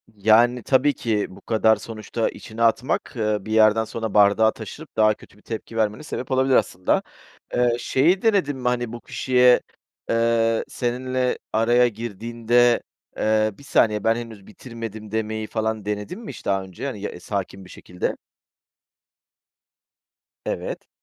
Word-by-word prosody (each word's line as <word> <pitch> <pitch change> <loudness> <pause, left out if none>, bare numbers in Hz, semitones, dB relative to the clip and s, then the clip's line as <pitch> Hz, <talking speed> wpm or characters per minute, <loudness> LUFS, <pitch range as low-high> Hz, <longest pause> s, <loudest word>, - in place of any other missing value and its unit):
Yani, 115 +4 +4
tabii 140 +2 +3
ki 110 -3 -1
bu - - -14
kadar 110 -1 +3
sonuçta 115 0 -3
içine 115 +1 -6
atmak, 115 +3 +1
ııı, 105 -3 -1
bir 110 - -6
yerden 110 0 +5
sonra 110 -1 -5
bardağı 105 +2 +5
taşırıp 140 +7 -10
daha 110 0 +5
kötü 105 - -18
bir - - -21
tepki 115 0 -7
vermene 110 +4 0
sebep 130 -3 -6
olabilir 130 0 +3
aslında. 90 0 +1 0.5
Eee, 120 -1 +2
şeyi 170 +12 +2
denedin 190 -11 +2
mi? 125 -1 -3
Hani, 120 -2 0
bu 120 - -7
kişiye, 125 -1 +3 0.5
eee, 115 0 +2
seninle 125 +1 -1 0.2
araya 120 +2 +4
girdiğinde, 120 +2 +1 0.4
eee, 110 0 +2
"Bir 140 - -15
saniye, 105 -6 +2
ben 115 0 +3
henüz 115 -4 -8
bitirmedim." 110 -2 -8
demeyi 110 0 -2
falan 110 -2 -2
denedin 105 - -4
mi 225 - -9
hiç - - -12
daha 95 -1 +1
önce, 95 +7 -8
hani, 115 -8 -5
ya, 90 - -5
sakin 95 0 -5
bir - - -15
şekilde? 90 - -4 2.3
Evet. - - -4
115 Hz, 150 wpm, -23 LUFS, 110-125 Hz, 2.3 s, yerden